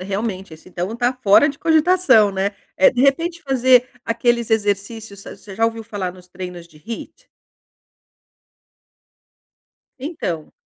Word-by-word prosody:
realmente, 195 -2 -4
esse 160 - -17
então 185 +6 -4
tá 245 +1 +1
fora 205 +9 +6
de 280 - -6
cogitação, 315 - +4
né. 195 +1 -1 0.2
Eh, 190 - +6
de 245 - -2
repente 330 +5 +1
fazer 255 -2 +3 0.2
aqueles 235 0 0
exercícios 205 -1 -2
a - - -9
você 200 -2 -12
já 225 - +2
ouviu 225 0 -4
falar 200 -5 -5
nos 180 -1 -17
treinos 180 -2 -8
de 155 - -21
HIIT? 230 - -9 2.7
Então 250 - -5
225 Hz, 135 wpm, -20 LUFS, 190-260 Hz, 2.7 s, fora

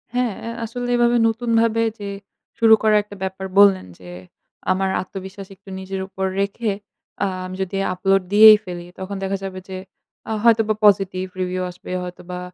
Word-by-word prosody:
হ্যাঁ 250 -3 +1
আ - - -3 0.2
আসলে 245 +2 -5
এভাবে 240 0 +3
নতুনভাবে 230 0 +1 0.2
যে 200 - -5 0.5
শুরু 225 -1 +6
করা 215 -1 +4
একটা 205 0 -12
ব্যাপার 190 0 -4
বললেন 200 - +6
যে 90 - -12 0.6
আমার 190 +1 +1
আত্মবিশ্বাস 190 +1 -9
একটু 195 +1 -17
নিজের 190 0 -5
উপর 190 0 -4 0.2
রেখে 205 +2 -1 0.5
আ - - +3 0.2
আমি 185 0 -7
যদি 190 +1 -6 0.2
আপলোড 195 +1 +1
দিয়েই 215 +1 +10
ফেলি। 175 -1 -7
তখন 190 +1 -5
দেখা 195 +1 -1
যাবে 190 -1 -5
যে 190 - -5 0.5
আ - - -2
হয়তোবা 225 -2 +4
পজিটিভ 195 -2 +3 0.2
রিভিউ 185 0 -2
আসবে, 180 0 -11
হয়তোবা 180 0 -7
195 Hz, 165 wpm, -21 LUFS, 185-220 Hz, 0.6 s, দিয়েই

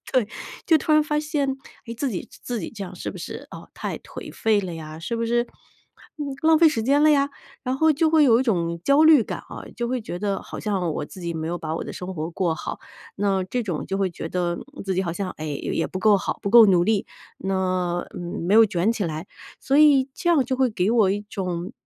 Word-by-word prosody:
对， 250 -5 +2 0.4
就 320 -2 +5
突 310 - 0
然 305 0 +6
发 300 0 -1
现， 290 -3 -1 0.3
诶， 230 - -6
自 270 +4 -2
己 190 - -4 0.2
自 240 -3 -3
己 - - -5
这 205 -4 -6
样 185 0 -9
是 - - -5
不 - - -9
是， - - -7
呃， - - -10
太 - - -4
颓 - - -10
废 220 -2 +2
了 185 -3 -5
呀？ 155 -1 -8
是 205 +8 -3
不 230 - -1
是 240 +1 +1 1.0
浪 320 0 +5
费 330 - +7
时 230 -7 -1
间 280 +5 +3
了 310 - +6
呀？ 280 -1 +3 0.3
然 255 0 -1
后 315 +2 +4
就 315 +2 +2
会 310 -1 +5
有 235 -3 +5
一 - - +2
种 170 -8 -1
焦 280 - +5
虑 310 -5 +7
感 - - -5
啊， - - -8
就 240 - -2
会 255 0 -1
觉 175 -5 -6
得 200 0 -2
好 - - -8
像 190 -5 -1
我 - - -3
自 185 - -12
己 170 -1 -4
没 160 0 -3
有 175 +1 -2
把 160 -1 -4
我 - - -3
的 - - -6
生 185 +1 -6
活 160 0 -4
过 170 -1 0
好。 - - -6 0.4
那 195 -2 +1
这 245 +6 -2
种 180 -8 -3
就 195 - -2
会 195 -1 +1
觉 170 - -7
得 175 0 -1 0.3
自 190 -1 -1
己 185 - +1
好 170 -3 -3
像， 185 +2 -3
哎， 155 - -8
也 145 -2 -3
也 165 - 0
不 185 - -5
够 210 +1 +5
好， 190 - -3
不 - - -1
够 230 +2 +9
努 180 -3 +4
力， 210 0 +1 0.3
那 185 -2 -1 0.4
没 180 +5 +1
有 225 +1 +8
卷 195 0 +1
起 215 -4 -2
来。 160 -1 -4 0.3
所 270 - +1
以 285 -3 +6
这 345 - 0
样 320 -5 +4
就 260 +1 -2
会 260 -1 +2
给 200 -1 0
我 220 -5 +4
一 205 +1 -1
种 180 0 -4
205 Hz, 265 characters per minute, -24 LUFS, 180-260 Hz, 1.0 s, 够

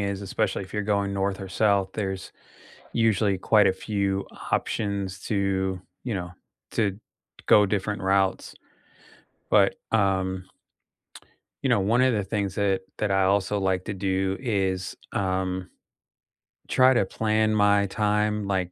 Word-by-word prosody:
is, 100 -1 -2
especially 100 0 -1
if 95 - -11
you're 105 - -1
going 100 -1 0
north 100 0 -1
or 95 - -6
south, 100 0 +2
there's 95 -2 -4 0.6
usually 110 -3 +2
quite 105 +2 +4
a 95 - +2
few 100 -1 -2 0.3
options 100 -2 -1
to, 95 -2 -1 0.2
you 120 - -3
know, 90 -3 -4 0.4
to 100 -4 0 0.5
go 105 - +6
different 100 +1 -2
routes. 95 0 +1 1.0
But, - - +4 0.2
um 95 -3 +1 1.2
you 135 - +1
know, 115 -5 +3
one 110 +6 +2
of 130 -1 +4
the 105 -2 0
things 100 -1 -2
that 100 -2 +1 0.2
that 105 - 0
I 95 -1 +3
also 100 +1 +1
like 95 -1 0
to 105 - -4
do 95 0 -1
is, 95 -7 -1 0.2
um, 95 -1 -1 1.0
try 130 0 +5
to 120 - +2
plan 110 +1 +1
my 105 -1 +4
time, 105 0 0
like, 95 -2 -1
100 Hz, 140 wpm, -25 LUFS, 95-105 Hz, 1.2 s, go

